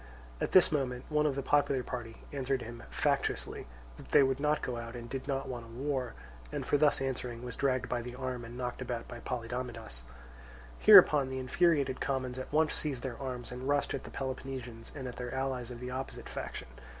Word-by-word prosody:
At - - 0
this 185 - +8
moment 130 -4 -1
one 150 0 +3
of 140 - 0
the 140 - -2
popular 140 -3 +3
party 120 -3 -6
answered 135 -2 0
him 120 +1 -8
factiously - - 0 0.3
that - - -12
they - - +7
would 135 0 +1
not 150 +1 +1
go 125 -1 -2
out 115 0 -6
and 120 -1 -6
did 135 +2 -5
not 135 -1 -1
want 120 -3 -5
a - - -14
war, 130 0 -2 0.4
and - - -3
for - - +2
thus 150 -3 +4
answering 125 -3 -3
was 125 -1 -5
dragged 130 -2 +1
by 120 -1 -1
the 120 +1 -7
arm 130 -2 -3
and 115 +1 -8
knocked 125 0 -3
about 120 -2 -3
by 120 - -8
Polydamidas. 115 - -4 0.8
Hereupon 135 - +9
the 130 - -3
infuriated 140 0 +2
commons 130 -2 -1
at 130 - -6
once 155 +1 +3
seized 140 -5 -2
their 130 -1 -4
arms 125 -3 -4
and 125 +2 -4
rushed 145 0 +2
at 135 - -3
the - - -8
Peloponnesians 130 -3 -5
and 135 -3 -5
at 125 - -7
their 125 -1 -4
allies 130 -2 -1
of 120 -1 -7
the 125 +1 -5
opposite 130 +1 -5
faction. - - -5
130 Hz, 210 wpm, -32 LUFS, 120-135 Hz, 0.8 s, Hereupon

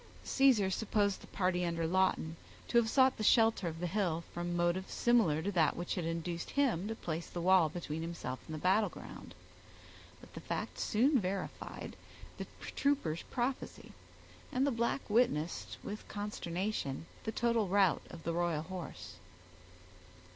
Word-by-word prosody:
Caesar 245 -8 +4
supposed 200 -1 +1
the - - -12
party 180 -2 0
under 170 -1 -1
Lawton 175 -2 +1 0.3
to 235 - +5
have 225 -1 +1
sought 260 +1 +4
the 215 - -3
shelter 225 -4 +4
of 165 0 -4
the 180 - -2
hill 175 -3 0
from 175 0 -2
motives 175 +2 0
similar 215 -11 +3
to 200 - -1
that 165 -5 +3
which 175 0 -3
had 180 -4 -2
induced 170 +1 -3
him 240 -10 +1
to 225 - -3
place 165 -5 -4
the 175 - -5
wall 180 -2 +5
between 160 -1 -4
himself 165 -6 -4
and 155 - -5
the - - -5
battle 195 +6 +3
ground; - - -10 0.8
but - - -16
the - - -7
fact - - -4
soon 255 +6 +3
verified 190 -1 -4 0.4
the - - -4 0.3
trooper's 220 - +1
prophecy, 250 +2 -3 0.6
and 255 +2 +2
the 285 - +2
black 235 +3 -1
witnessed 205 -8 +1
with 210 +1 -6
consternation 190 -7 -3 0.2
the 220 - -1
total 235 -3 +1
rout 195 -1 +3
of 165 - -10
the 165 - -1
royal 170 -3 0
horse. 185 0 -7
185 Hz, 160 wpm, -34 LUFS, 170-220 Hz, 0.8 s, to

